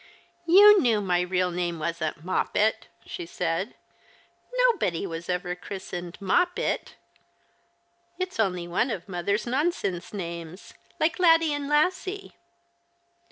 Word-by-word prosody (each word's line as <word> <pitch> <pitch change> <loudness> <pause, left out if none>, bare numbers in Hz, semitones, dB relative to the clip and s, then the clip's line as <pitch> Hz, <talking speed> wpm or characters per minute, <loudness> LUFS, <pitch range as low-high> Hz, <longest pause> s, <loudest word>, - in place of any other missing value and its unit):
" - - -40
Yon 405 +3 +8
knew 230 -4 +3
my 180 -3 +1
real 180 0 0
name 175 -1 -2
wasn't 160 -1 -3
Moppet," 215 +4 0 0.2
she - - -6
said. 175 +5 -2 0.4
" - - -12
iNTobody 180 - -2
was 165 -1 -6
ever 180 0 -1
christened 180 -2 -7
Moppet! 355 - 0 1.2
It's 370 -7 -4
only 180 -5 0
one 180 +9 0
of 195 -7 -5
mother's 200 +3 -1
nonsense 250 - -1
names, 170 -2 -7 0.3
like 320 +3 +1
Laddie 330 -3 +5
and 290 -1 -3
Lassie." 370 +6 0
195 Hz, 120 wpm, -26 LUFS, -, 1.2 s, Yon